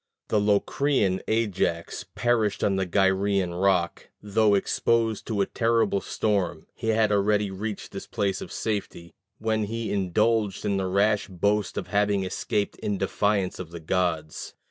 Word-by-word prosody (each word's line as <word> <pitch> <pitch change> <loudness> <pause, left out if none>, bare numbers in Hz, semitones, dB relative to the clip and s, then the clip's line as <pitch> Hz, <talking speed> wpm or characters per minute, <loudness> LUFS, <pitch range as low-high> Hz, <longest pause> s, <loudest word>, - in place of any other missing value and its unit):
The 105 - +3
Locrian 105 0 +1
Ajax 95 -7 -1
perished 115 -4 +1
on 100 - +2
the 95 -1 -1
Gyræan 95 -1 +1
rock. 90 -4 +1
Though 105 0 +2
exposed 115 +2 +1
to 105 -3 0
a - - +3
terrible 115 -4 +1
storm, 95 -5 -1
he 115 - -6
had 110 -1 +3
already 105 0 +2
reached 105 +2 -5
this 100 - -7
place 100 -4 -1
of - - -7
safety, 100 -6 -4 0.2
when 110 -1 0
he 115 +1 -3
indulged 105 +2 +1
in 100 -1 +1
the 95 -1 -1
rash 100 +3 +2
boast 100 +2 0
of - - -4
having 100 -1 +2
escaped 100 +2 -2
in 100 -1 -2
defiance 100 0 0
of 90 -3 -6
the 85 0 -8
gods. 80 -2 -2
100 Hz, 150 wpm, -26 LUFS, 95-110 Hz, 0.2 s, The